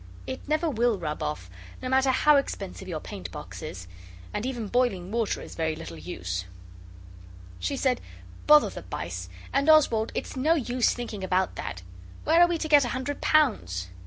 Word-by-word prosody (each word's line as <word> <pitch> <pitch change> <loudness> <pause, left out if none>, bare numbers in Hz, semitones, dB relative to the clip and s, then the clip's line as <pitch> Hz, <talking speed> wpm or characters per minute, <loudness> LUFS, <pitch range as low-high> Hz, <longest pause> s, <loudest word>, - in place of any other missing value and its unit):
It 260 - -5
never 310 +3 +1
will 240 -5 +2
rub 150 -4 -4
off; 95 -12 -3 0.3
no - - -5
matter 265 +1 +3
how 295 +3 +5
expensive 195 -8 -3
your 165 -4 -3
paintbox 90 - -8
is 90 0 -7 0.5
and 210 +4 -2
even 240 -5 -3
boiling 200 -6 0
water 230 -2 0
is - - -10
very 160 -1 -1
little 155 - -8
use. 90 +2 -4 1.1
She 280 - -2
said, 255 -2 +1 0.5
'Bother 300 0 +7
the - - -7
bice! - - -5 0.2
And, 280 +3 +2
Oswald, 240 -8 +5
it's - - -4
no 305 +6 +3
use 250 -4 +1
thinking 220 -5 -5
about 185 0 +1
that. 90 - -5 0.4
Where 330 +3 +5
are 350 - +8
we 345 -1 0
to 315 - -3
get 295 -2 +6
a - - -1
hundred 280 +2 -4
pounds? 210 - +2
240 Hz, 175 wpm, -27 LUFS, 170-280 Hz, 1.1 s, are